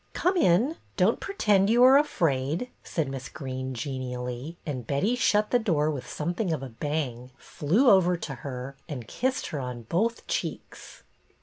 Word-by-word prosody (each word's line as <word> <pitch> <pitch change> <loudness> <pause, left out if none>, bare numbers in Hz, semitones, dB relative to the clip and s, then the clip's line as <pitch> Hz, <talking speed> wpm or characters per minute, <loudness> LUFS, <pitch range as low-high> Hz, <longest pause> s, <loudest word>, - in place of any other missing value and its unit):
" - - -38
Come 365 +2 +1
in! 250 - +3 0.2
Don't - - +3
pretend 210 - +2
you 240 +2 +5
are 260 +1 +8
afraid," 165 - +1
said 160 -4 -2
Miss 135 -1 -6
Greene, 130 -2 -5
genially; 125 +3 -5
and 130 -7 -4
Betty 195 - +1
shut 210 -3 +2
the 245 - +4
door 155 -9 +1
with 140 -4 -6
something 175 +5 -2
of 150 -4 -2
a 135 - -6
bang, 125 -1 -3
flew 190 - +1
over 180 -4 +5
to 150 - -5
her 135 0 -6
and 125 -7 -6
kissed 260 - -1
her 150 - -3
on 125 -2 -5
both 215 - -1
cheeks. - - -5
155 Hz, 170 wpm, -27 LUFS, 130-210 Hz, 0.2 s, are